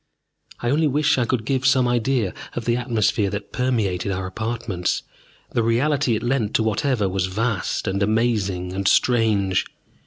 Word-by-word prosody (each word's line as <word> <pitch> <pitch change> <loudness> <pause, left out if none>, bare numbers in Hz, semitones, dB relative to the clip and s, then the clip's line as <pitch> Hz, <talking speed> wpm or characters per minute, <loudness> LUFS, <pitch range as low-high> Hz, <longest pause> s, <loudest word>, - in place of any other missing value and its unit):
I 120 - 0
only 155 +2 +3
wish 150 0 +2
I 120 - +2
could 115 -2 -1
give 130 0 0
some 130 -1 +4
idea 120 -4 0 0.2
of 115 - -4
the 120 - +2
atmosphere 115 -4 +1
that 100 0 -6
permeated 105 -7 0
our 95 0 -3
apartments, 110 -2 -2 0.5
the 120 - +1
reality 125 +2 +1
it - - -3
lent 120 -4 0
to 110 - +3
whatever 110 0 0
was 95 0 -1
vast 105 0 -2
and 95 +1 -1
amazing 100 -4 0
and 95 0 -1
strange. 105 -7 +3
115 Hz, 160 wpm, -22 LUFS, 100-125 Hz, 0.5 s, some